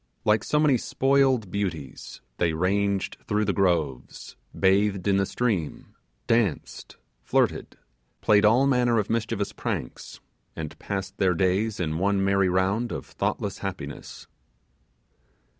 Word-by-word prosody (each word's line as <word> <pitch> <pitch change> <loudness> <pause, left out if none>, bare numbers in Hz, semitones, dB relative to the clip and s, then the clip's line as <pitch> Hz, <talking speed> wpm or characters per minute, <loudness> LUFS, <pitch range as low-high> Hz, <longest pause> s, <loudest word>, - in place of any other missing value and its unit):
Like 105 -1 +3
so 150 - +1
many 150 -4 +4
spoiled 135 -7 +1
beauties, 85 -10 -5 0.2
they 85 -2 +1
ranged 100 +3 0
through 105 0 +1
the 100 - 0
groves 85 -10 -1 0.2
bathed 100 0 +2
in 100 -1 +3
the 100 -1 +1
stream 105 -11 -2 0.3
danced 115 -8 -1 0.2
flirted - - 0 0.4
played 105 -1 +4
all 115 +6 +5
manner 125 -3 +2
of 105 -1 -1
mischievous 110 -2 -2
pranks, - - -5 0.4
and 80 -2 -7
passed 95 0 -5
their 90 -2 +2
days 95 +4 0
in 80 -2 -2
one 100 +1 +1
merry 100 -1 +2
round 95 +6 0
of - - -5
thoughtless - - -3
happiness. - - -7
100 Hz, 125 wpm, -25 LUFS, 95-110 Hz, 0.4 s, all